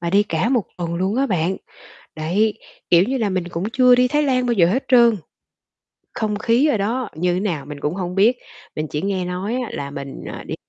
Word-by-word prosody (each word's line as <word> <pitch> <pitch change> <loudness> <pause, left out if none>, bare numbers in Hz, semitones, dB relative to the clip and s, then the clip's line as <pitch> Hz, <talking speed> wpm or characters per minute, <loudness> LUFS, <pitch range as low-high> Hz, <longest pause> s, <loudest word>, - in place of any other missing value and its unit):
và 170 0 -2
đi 200 +3 +4
cả 200 +2 -1
1 245 -6 +1
tuần 170 -1 -3
luôn 190 +6 -1
á 275 - +2
bạn. 185 -3 0 0.6
Đấy. 190 +8 +1 0.4
Kiểu 170 0 +6
như 260 +5 -1
là, 215 -4 0
mình 180 -2 -2
cũng 175 +2 -4
chưa 250 -1 +6
đi 250 0 +3
Thái 295 +3 +1
Lan 255 -3 +1
bao 240 - +1
giờ 180 -6 +4
hết 235 +10 0
trơn, 235 -3 +6 1.0
không 215 -2 -2
khí 235 +7 +3
ở 265 -8 +2
đó 230 +5 -2
như 175 +3 0
thế 180 - 0
nào 175 -8 -2
mình 145 -1 -8
cũng 150 +5 -2
hông 180 -2 -4
biết, 220 +6 +4 0.4
mình 155 0 -3
chỉ 150 0 -3
nghe 190 -1 -1
nói 180 +5 -3
á 250 -2 -3
là 140 0 -5
mình, 140 -1 -7
à, - - -7
đi - - -3
195 Hz, 235 wpm, -21 LUFS, 175-240 Hz, 1.0 s, Kiểu